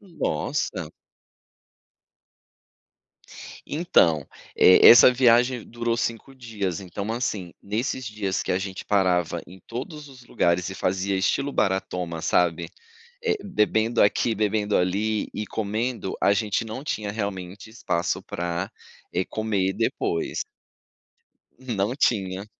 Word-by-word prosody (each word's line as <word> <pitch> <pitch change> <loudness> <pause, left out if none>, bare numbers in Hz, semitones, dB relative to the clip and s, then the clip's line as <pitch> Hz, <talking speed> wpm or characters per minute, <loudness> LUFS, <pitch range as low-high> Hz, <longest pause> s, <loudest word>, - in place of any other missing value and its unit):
Nossa. 165 - -3 2.7
Então, 85 - +2 0.3
eh, 90 - +7
essa 120 +2 +9
viagem 125 0 +3
durou 115 0 -2
5 115 +3 -3
dias, 105 -8 -4
então, 100 +3 -5
assim, 105 -7 -3
nesses 115 +5 -2
dias 105 -2 -2
que - - -4
a 90 - +2
gente 95 -1 -6
parava 90 -4 +1
em 95 +2 -14
todos 145 +5 -7
os 130 -3 -15
lugares 85 +1 +1
e 95 - -6
fazia 95 +1 -1
estilo 135 +9 0
"baratoma", 90 -5 -1
sabe, 85 0 +1 0.5
eh, 450 -2 +1
bebendo 110 - +1
aqui, 105 +3 +3
bebendo 105 -1 0
ali 105 +4 0
e 105 - -3
comendo, 110 0 -3
a - - +5
gente 105 +2 0
não 115 +6 -7
tinha 105 -8 -3
realmente 100 -2 -5
espaço 90 -6 -2
pra, 85 +2 -4 0.4
eh, 90 - 0
comer 100 -3 -1
depois. 85 -3 -1 1.2
Não 120 -3 -2
tinha. 100 -7 0
105 Hz, 115 wpm, -24 LUFS, 95-120 Hz, 2.7 s, essa